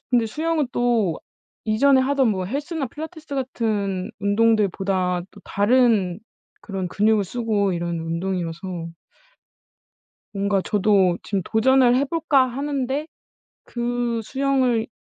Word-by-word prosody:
근데 240 -3 +3
수영은 310 +3 -1
또 230 -8 +1 0.5
이전에 260 +5 +4
하던 265 -1 +2
뭐 190 -4 -1
헬스나 285 - -3
필라테스 310 +3 -8
같은 215 -7 -2
운동들보다 200 -4 +1
또 - - -15
다른 205 -4 +2 0.4
그런 190 -3 -4
근육을 210 +2 +2
쓰고 210 -2 0
이런 170 -1 -2
운동이어서 170 0 -4 1.4
뭔가 200 -1 0
저도 195 -3 +2
지금 200 -2 -2
'도전을 250 +3 +4
해 270 - +2
볼까.' 290 -3 +2
하는데 275 +2 -2 0.6
그 240 -1 -2
수영을 260 -3 +1
225 Hz, 250 characters per minute, -22 LUFS, 195-265 Hz, 1.4 s, 이전에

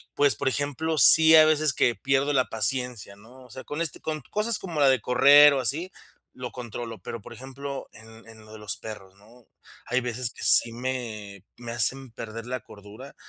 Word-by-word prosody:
Pues, 145 -1 +2
por - - -4
ejemplo, 145 +4 -3
sí 160 +4 +7
hay 155 -1 +7
veces 155 -2 +2
que 120 - +1
pierdo 135 +1 -1
la 130 -2 +1
paciencia, 120 -2 -2
¿no? 120 +6 -18
O 125 - -19
sea, 130 - -10
con 145 +6 -6
este, 165 - -4
con 155 -1 -5
cosas 215 +2 0
como 170 -5 -6
la 140 -2 +4
de 130 -2 +2
correr 145 +4 +5
o 135 - -1
así, 155 - -1 0.4
lo 125 -1 -8
controlo. 120 -2 -8
Pero, 115 - -8
por - - -13
ejemplo, 135 +1 -9
en 110 +1 -16
en 110 -1 -16
lo 110 - -17
de - - -10
los 105 -1 -1
perros, 100 -4 -11
¿no? 115 +4 -22 0.4
Hay 125 +1 -1
veces 120 0 -2
que - - -13
sí 115 - +6
me 115 -6 -7
me 120 -1 -9
hacen 125 +3 0
perder 115 +1 -9
la 130 -2 -5
cordura. 105 +6 -14
125 Hz, 205 wpm, -24 LUFS, 115-140 Hz, 0.4 s, sí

